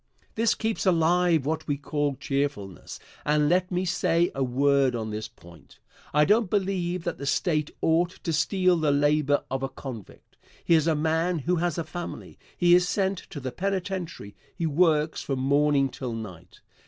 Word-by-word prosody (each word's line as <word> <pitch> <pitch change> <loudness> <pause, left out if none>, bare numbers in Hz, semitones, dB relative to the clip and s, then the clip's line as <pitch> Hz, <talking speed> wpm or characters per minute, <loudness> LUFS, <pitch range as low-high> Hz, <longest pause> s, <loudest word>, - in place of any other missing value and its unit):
This 225 0 +2
keeps 220 -2 -2
alive 170 -3 +3
what 160 +1 -2
we 145 -2 0
call 145 0 -2
cheerfulness. 140 - -4 0.2
And 150 0 +2
let 180 +3 +2
me 180 0 -1
say 170 -1 +1
a 135 - -1
word 135 0 +2
on 110 -2 -4
this 110 +1 -4
point. 85 -3 -18 0.3
I 150 +1 +4
don't 210 +2 +3
believe 185 -3 -1
that 175 - -4
the 140 - -5
State 155 0 0
ought 165 +2 +3
to 165 - -1
steal 180 +5 +2
the 155 -2 +1
labor 145 0 +2
of 135 0 -2
a 135 - -2
convict. 125 -6 -10 0.3
Here 165 -1 +5
is 155 - -2
a 160 - +3
man 160 +3 0
who 175 +5 0
has 175 -1 -1
a 165 - -1
family. 170 +2 -8 0.2
He 175 0 +4
is 180 +1 +4
sent 195 -2 0
to 145 - -7
the 130 -1 -5
penitentiary. 185 - -4 0.2
He 170 - -2
works 155 0 +2
from 135 - -3
morning 140 +1 +2
till 125 -2 -6
night. 90 -6 -9
155 Hz, 180 wpm, -26 LUFS, 140-175 Hz, 0.3 s, Here